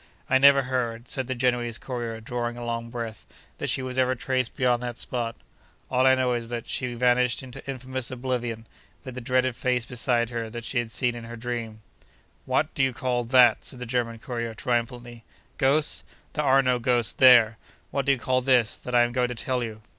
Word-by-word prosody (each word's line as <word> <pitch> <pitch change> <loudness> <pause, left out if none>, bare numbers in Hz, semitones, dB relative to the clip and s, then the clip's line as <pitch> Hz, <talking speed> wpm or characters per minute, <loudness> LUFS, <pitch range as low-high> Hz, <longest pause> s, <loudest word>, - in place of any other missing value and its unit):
I 130 - +4
never 140 0 +7
heard 120 -2 -2
(said 130 0 -2
the 130 - -2
Genoese 120 -2 0
courier, 120 -3 -5
drawing 120 +1 -4
a 120 - -6
long 115 0 -3
breath) 115 -2 -6 0.4
that - - -1
she 130 - 0
was 130 0 -2
ever 130 0 +2
traced 130 0 -1
beyond 125 -3 +2
that 120 -1 -5
spot. 120 -2 -3 0.6
All 130 0 +3
I 130 - +6
know 130 -1 +1
is, 120 -1 -3
that 120 -1 -5
she 125 -2 -3
vanished 125 +1 +2
into 130 +1 -10
infamous 130 -1 -4
oblivion, 120 -3 -3 0.4
with 130 -3 -7
the 125 - -6
dreaded 130 0 +1
face 125 -2 0
beside 120 -1 0
her 115 -1 -3
that 120 +1 -7
she 120 - -1
had 120 -1 -3
seen 120 +2 0
in 120 -1 -8
her 120 +1 -8
dream. 115 -2 -5 0.6
'What - - +1
do - - -1
you 130 -1 +1
call 120 0 -1
that?' 120 -2 +5
said 130 - -5
the 125 - -6
German 115 -1 -1
courier, 115 -1 -5
triumphantly. 120 0 -3 0.4
'Ghosts! 145 +3 +2 0.3
There 150 -1 -1
are 135 0 +5
no 125 -1 +2
ghosts 120 -1 +2
there! 120 -4 +6 0.3
What 140 0 -2
do - - +6
you 135 - +2
call 130 +1 0
this, 125 -3 +2
that 125 - -4
I 120 - +6
am 120 - 0
going 125 0 +1
to 125 - -5
tell 125 +2 -1
you? 110 -2 -7
125 Hz, 210 wpm, -26 LUFS, 120-130 Hz, 0.6 s, never